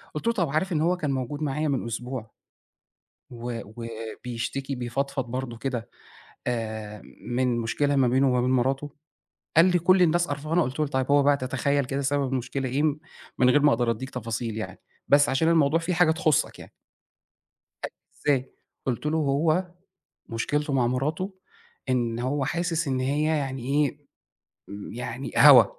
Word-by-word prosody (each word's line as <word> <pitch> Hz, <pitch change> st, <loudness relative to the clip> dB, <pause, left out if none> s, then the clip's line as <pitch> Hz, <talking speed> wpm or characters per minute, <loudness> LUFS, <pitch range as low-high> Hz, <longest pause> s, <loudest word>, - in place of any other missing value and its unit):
قُلتله: 230 Hz, +10 st, 0 dB
"طَب 175 Hz, -8 st, 0 dB
عارف 155 Hz, +7 st, 0 dB
إن 155 Hz, -, +1 dB
هو 175 Hz, +3 st, +2 dB
كان 150 Hz, -5 st, -1 dB
موجود 135 Hz, +3 st, -3 dB
معايا 150 Hz, +1 st, -1 dB
من 135 Hz, -4 st, -1 dB
أسبوع؟ 115 Hz, 0 st, -5 dB, 1.0 s
و 120 Hz, -1 st, -5 dB
وبيشتكي، 115 Hz, +4 st, -5 dB
بيفضفض 135 Hz, +2 st, -2 dB
برضه 125 Hz, -2 st, -4 dB
كده 120 Hz, -2 st, -3 dB, 0.6 s
آآ، 110 Hz, -3 st, -3 dB, 0.3 s
من 125 Hz, 0 st, +1 dB
مشكلة 140 Hz, +6 st, 0 dB
ما 135 Hz, -2 st, +4 dB
بينه 130 Hz, +2 st, +3 dB
وما 125 Hz, -1 st, +2 dB
بين 125 Hz, -, +1 dB
مراته؟"، 135 Hz, +3 st, +1 dB, 0.7 s
قال 165 Hz, -, +8 dB
لي: 180 Hz, -1 st, +3 dB
"كل 185 Hz, +2 st, +4 dB
الناس 175 Hz, 0 st, +3 dB
قرفانة."، 155 Hz, +4 st, 0 dB
قُلت 130 Hz, +1 st, -4 dB
له: 150 Hz, -, +2 dB
"طيب 130 Hz, -1 st, -1 dB
هو 145 Hz, 0 st, +5 dB
بقى 145 Hz, 0 st, +4 dB
تتخيّل 135 Hz, +2 st, 0 dB
كده 135 Hz, +2 st, -2 dB
سبب 140 Hz, 0 st, 0 dB
المشكلة 130 Hz, +1 st, -2 dB
إيه؟ 140 Hz, +4 st, 0 dB
م 150 Hz, -1 st, +1 dB, 0.4 s
من 125 Hz, -, +5 dB
غير 145 Hz, +3 st, +5 dB
ما 145 Hz, -, +6 dB
أقدر 115 Hz, 0 st, +1 dB
أدّيك 130 Hz, +4 st, -5 dB
تفاصيل 115 Hz, -2 st, -4 dB
يعني 95 Hz, -3 st, -6 dB, 0.3 s
بس 145 Hz, 0 st, +5 dB
عشان 135 Hz, +5 st, +2 dB
الموضوع 160 Hz, -1 st, +4 dB
في 170 Hz, +2 st, -2 dB
حاجة 175 Hz, -2 st, +4 dB
تخصّك 160 Hz, -3 st, +1 dB
يعني.". -, -, -12 dB, 1.1 s
قال -, -, -3 dB
لي: -, -, -63 dB, 0.3 s
"إزاي؟"، 135 Hz, -3 st, +2 dB, 0.3 s
قُلت 130 Hz, +2 st, -2 dB
له: 155 Hz, +1 st, +1 dB
"هو 155 Hz, +4 st, +2 dB, 0.6 s
مشكلته 145 Hz, +6 st, -1 dB
مع 125 Hz, -3 st, +3 dB
مراته 155 Hz, +10 st, -1 dB, 0.6 s
إن 120 Hz, -2 st, 0 dB
هو 135 Hz, +3 st, -1 dB
حاسس 170 Hz, 0 st, -1 dB
إن 130 Hz, -1 st, 0 dB
هي 140 Hz, +4 st, 0 dB
يعني 140 Hz, -5 st, -1 dB
إيه، 145 Hz, +1 st, 0 dB, 0.9 s
يعني 125 Hz, +2 st, -5 dB
هوا، 140 Hz, -5 st, +9 dB
135 Hz, 165 wpm, -26 LUFS, 125-150 Hz, 1.1 s, هوا